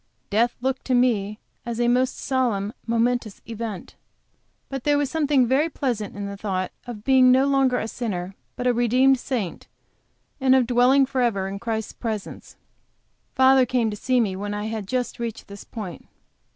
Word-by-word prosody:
Death 230 Hz, +4 st, +2 dB
looked 265 Hz, +1 st, -1 dB
to 255 Hz, -, +1 dB
me 215 Hz, -5 st, +1 dB, 0.3 s
as 235 Hz, -1 st, -4 dB
a 240 Hz, -, +2 dB
most 250 Hz, +2 st, +2 dB
solemn, 235 Hz, -6 st, -1 dB
momentous 230 Hz, -2 st, 0 dB
event 225 Hz, -4 st, -6 dB, 0.7 s
but 270 Hz, -2 st, -5 dB
there 290 Hz, -1 st, +3 dB
was 290 Hz, -2 st, -1 dB
something 290 Hz, -5 st, +3 dB
very 275 Hz, +7 st, +2 dB
pleasant 235 Hz, -11 st, -3 dB
in 200 Hz, 0 st, -5 dB
the 200 Hz, 0 st, -5 dB
thought 190 Hz, -2 st, -3 dB, 0.2 s
of 220 Hz, -4 st, -7 dB
being 260 Hz, -1 st, +5 dB
no 260 Hz, +2 st, +5 dB
longer 270 Hz, -2 st, +2 dB
a 220 Hz, -, -2 dB
sinner, 195 Hz, -6 st, -4 dB, 0.2 s
but 250 Hz, -, -4 dB
a 250 Hz, -, +4 dB
redeemed 250 Hz, +3 st, +3 dB
saint, 235 Hz, -10 st, -4 dB, 0.7 s
and 265 Hz, -1 st, +4 dB
of 260 Hz, -2 st, +4 dB
dwelling 250 Hz, +3 st, +4 dB
forever 240 Hz, -8 st, 0 dB
in 195 Hz, +1 st, -5 dB
Christ's 220 Hz, -1 st, -3 dB
presence. 220 Hz, -4 st, -6 dB, 0.8 s
Father 260 Hz, -1 st, +5 dB
came 235 Hz, -3 st, +1 dB
to -, -, -4 dB
see 255 Hz, +4 st, +1 dB
me 205 Hz, -5 st, 0 dB
when 205 Hz, +2 st, -4 dB
I 210 Hz, 0 st, -3 dB
had 220 Hz, -3 st, -4 dB
just 250 Hz, +2 st, -2 dB
reached 235 Hz, -2 st, -5 dB
this 200 Hz, 0 st, -10 dB
point. 200 Hz, -8 st, -8 dB
240 Hz, 175 wpm, -24 LUFS, 210-260 Hz, 0.8 s, being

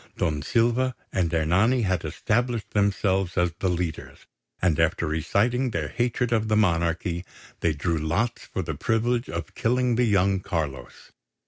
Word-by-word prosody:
Don 75 Hz, -2 st, 0 dB
Silva 120 Hz, -, +1 dB, 0.2 s
and 85 Hz, -4 st, +1 dB
Ernani 95 Hz, +10 st, +2 dB
had 95 Hz, -2 st, 0 dB
established 120 Hz, 0 st, -1 dB
themselves 95 Hz, -3 st, +1 dB
as 90 Hz, 0 st, +2 dB
the 95 Hz, -, +1 dB
leaders; 85 Hz, -2 st, -4 dB, 0.3 s
and 85 Hz, -4 st, +1 dB
after 80 Hz, +1 st, +2 dB
reciting 105 Hz, -, +1 dB
their 120 Hz, -, -2 dB
hatred 120 Hz, 0 st, -1 dB
of 110 Hz, -1 st, +1 dB
the 110 Hz, -, +2 dB
monarchy, 85 Hz, -2 st, +1 dB, 0.4 s
they 80 Hz, -, +1 dB
drew 80 Hz, +2 st, -1 dB
lots 90 Hz, +10 st, -1 dB
for -, -, -4 dB
the -, -, -3 dB
privilege 120 Hz, +2 st, 0 dB
of 85 Hz, 0 st, -5 dB
killing 125 Hz, 0 st, +1 dB
the 125 Hz, -, +3 dB
young 100 Hz, -2 st, +3 dB
Carlos. 75 Hz, -10 st, -5 dB
95 Hz, 150 wpm, -25 LUFS, 85-115 Hz, 0.4 s, the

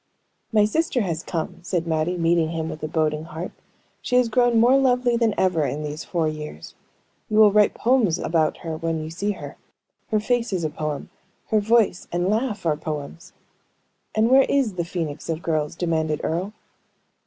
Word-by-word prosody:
"My 210 Hz, -2 st, +4 dB
sister 260 Hz, +2 st, 0 dB
has 170 Hz, -5 st, -2 dB
come!" 165 Hz, 0 st, -4 dB
said 175 Hz, -1 st, -2 dB
Mattie, 165 Hz, +2 st, 0 dB
meeting 165 Hz, -1 st, +2 dB
him 160 Hz, -1 st, -3 dB
with 155 Hz, -, -7 dB
a 155 Hz, -, -2 dB
boding 155 Hz, -1 st, -1 dB
heart. 165 Hz, +2 st, -6 dB, 0.5 s
"She 250 Hz, -, -1 dB
has 250 Hz, -2 st, +4 dB
grown 240 Hz, 0 st, +3 dB
more 245 Hz, +4 st, +5 dB
lovely 250 Hz, -2 st, +3 dB
than 230 Hz, -2 st, +1 dB
ever 180 Hz, -4 st, +2 dB
in 145 Hz, +1 st, -2 dB
these 150 Hz, +1 st, -5 dB
four 170 Hz, -3 st, -1 dB
years. 150 Hz, -, -7 dB, 0.6 s
You 215 Hz, -, 0 dB
will 215 Hz, -1 st, +7 dB
write 210 Hz, 0 st, +4 dB
poems 230 Hz, -9 st, +2 dB
about 160 Hz, -3 st, 0 dB
her 160 Hz, -1 st, -3 dB
when 165 Hz, 0 st, -2 dB
you 155 Hz, -, -6 dB
see 200 Hz, +5 st, -2 dB
her. -, -, -9 dB, 0.5 s
Her 215 Hz, -, +2 dB
face 235 Hz, +1 st, 0 dB
is 180 Hz, -3 st, -1 dB
a 155 Hz, -, -1 dB
poem, 150 Hz, -1 st, -4 dB, 0.4 s
her 215 Hz, -, +3 dB
voice 215 Hz, -3 st, +2 dB
and 175 Hz, +2 st, 0 dB
laugh 215 Hz, -4 st, -1 dB
are 155 Hz, -2 st, +2 dB
poems!" 155 Hz, +1 st, -6 dB, 0.8 s
"And 220 Hz, +2 st, +3 dB
where 270 Hz, +1 st, +6 dB
is 270 Hz, -7 st, +2 dB
the 175 Hz, -2 st, -2 dB
phoenix 165 Hz, -3 st, -5 dB
of 165 Hz, 0 st, -3 dB
girls?" 155 Hz, -2 st, -1 dB
demanded 160 Hz, -3 st, -1 dB
Earle. 180 Hz, +6 st, -2 dB
175 Hz, 185 wpm, -23 LUFS, 160-220 Hz, 0.8 s, will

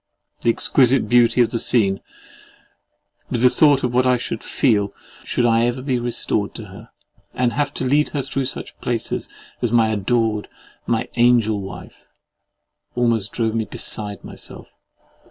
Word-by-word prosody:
The -, -, +1 dB
exquisite 130 Hz, +2 st, +3 dB
beauty 120 Hz, 0 st, +4 dB
of 120 Hz, -, +2 dB
the 115 Hz, -, -2 dB
scene, 100 Hz, -6 st, +2 dB, 1.3 s
with 120 Hz, 0 st, -2 dB
the 125 Hz, -, +6 dB
thought 145 Hz, -3 st, +3 dB
of 125 Hz, -1 st, -1 dB
what 125 Hz, +1 st, +2 dB
I 125 Hz, -1 st, +3 dB
should 115 Hz, -1 st, -5 dB
feel, 105 Hz, -6 st, +1 dB, 0.3 s
should 120 Hz, -, -1 dB
I 115 Hz, 0 st, +3 dB
ever 125 Hz, +1 st, -3 dB
be 130 Hz, -3 st, -1 dB
restored 120 Hz, -3 st, -2 dB
to 110 Hz, -, -7 dB
her, 105 Hz, +4 st, -13 dB, 0.5 s
and 125 Hz, -1 st, 0 dB
have 145 Hz, -1 st, -1 dB
to 130 Hz, -, -2 dB
lead 145 Hz, +3 st, +2 dB
her 140 Hz, -2 st, -3 dB
through 135 Hz, 0 st, -3 dB
such 125 Hz, -, -3 dB
places 120 Hz, -2 st, -2 dB, 0.3 s
as 120 Hz, -, -1 dB
my 115 Hz, -2 st, +3 dB
adored, 110 Hz, 0 st, -1 dB, 0.4 s
my 115 Hz, -2 st, -1 dB
angelwife, 110 Hz, -5 st, 0 dB, 0.9 s
almost 115 Hz, -4 st, 0 dB
drove 115 Hz, -2 st, -1 dB
me 115 Hz, -1 st, -1 dB
beside 105 Hz, -3 st, +3 dB
myself. -, -, -8 dB
120 Hz, 155 wpm, -20 LUFS, 110-125 Hz, 1.3 s, the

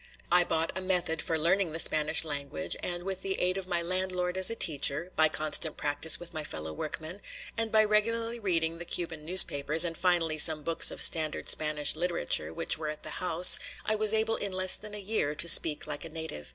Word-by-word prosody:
I 180 Hz, 0 st, +5 dB
bought 165 Hz, -1 st, -3 dB
a 190 Hz, -, -4 dB
method 180 Hz, -4 st, -2 dB
for 165 Hz, -, -3 dB
learning 170 Hz, +1 st, 0 dB
the -, -, -5 dB
Spanish 155 Hz, 0 st, +1 dB
language, 145 Hz, +4 st, -3 dB
and 175 Hz, 0 st, -5 dB
with 190 Hz, 0 st, -6 dB
the 190 Hz, 0 st, -4 dB
aid 180 Hz, +1 st, -1 dB
of 185 Hz, -, -9 dB
my 175 Hz, -2 st, -3 dB
landlord 180 Hz, 0 st, -3 dB
as 190 Hz, 0 st, +3 dB
a 230 Hz, -, -5 dB
teacher, 155 Hz, -1 st, -1 dB
by 160 Hz, 0 st, +3 dB
constant 155 Hz, 0 st, -2 dB
practice 145 Hz, +2 st, +2 dB
with 175 Hz, -1 st, -10 dB
my 155 Hz, -1 st, -6 dB
fellow 80 Hz, -, -8 dB
workmen, 160 Hz, -, -7 dB, 0.3 s
and 225 Hz, -1 st, -2 dB
by 215 Hz, 0 st, +3 dB
regularly 230 Hz, +2 st, -1 dB
reading 165 Hz, -5 st, -3 dB
the 175 Hz, -, -8 dB
Cuban 165 Hz, -3 st, -6 dB
newspapers 160 Hz, -2 st, +4 dB
and 165 Hz, -1 st, -5 dB
finally 170 Hz, -3 st, -1 dB
some 155 Hz, 0 st, +5 dB
books 165 Hz, +1 st, +2 dB
of -, -, -1 dB
standard 155 Hz, -2 st, +2 dB
Spanish 150 Hz, -1 st, +1 dB
literature 170 Hz, -, -2 dB
which 80 Hz, -, -1 dB
were 155 Hz, -1 st, -5 dB
at 150 Hz, -, -9 dB
the -, -, -6 dB
house, 180 Hz, 0 st, +6 dB, 0.3 s
I 215 Hz, -, -1 dB
was 215 Hz, -1 st, 0 dB
able 220 Hz, 0 st, -1 dB
in 200 Hz, -, -5 dB
less 185 Hz, 0 st, +6 dB
than 210 Hz, -1 st, -5 dB
a -, -, -8 dB
year 195 Hz, -8 st, -3 dB
to 170 Hz, -, -1 dB
speak 155 Hz, -2 st, +5 dB
like 150 Hz, -1 st, -7 dB
a 165 Hz, -, -8 dB
native. 160 Hz, -, -9 dB
170 Hz, 215 wpm, -27 LUFS, 155-185 Hz, 0.3 s, house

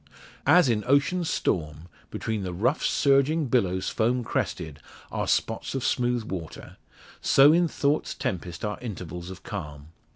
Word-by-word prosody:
As 180 Hz, -4 st, +6 dB
in 110 Hz, -3 st, +1 dB
ocean's 155 Hz, +6 st, +2 dB
storm, 75 Hz, -1 st, -2 dB, 0.2 s
between 110 Hz, -2 st, -3 dB
the 90 Hz, -2 st, -4 dB
rough 115 Hz, -, 0 dB
surging 140 Hz, +3 st, +3 dB
billows 95 Hz, -8 st, +1 dB
foam 120 Hz, +2 st, 0 dB
crested, 80 Hz, -9 st, -3 dB, 0.3 s
are -, -, -2 dB
spots -, -, -1 dB
of 135 Hz, -, -2 dB
smooth 120 Hz, -2 st, +1 dB
water, 90 Hz, -7 st, -7 dB, 0.4 s
so 140 Hz, +3 st, +6 dB
in 175 Hz, +1 st, +3 dB
thought's 145 Hz, -1 st, -1 dB
tempest 90 Hz, -, -4 dB
are 105 Hz, -1 st, -3 dB
intervals 90 Hz, -6 st, -6 dB
of 95 Hz, -1 st, -10 dB
calm. 75 Hz, -7 st, -7 dB
110 Hz, 140 wpm, -26 LUFS, 90-135 Hz, 0.4 s, As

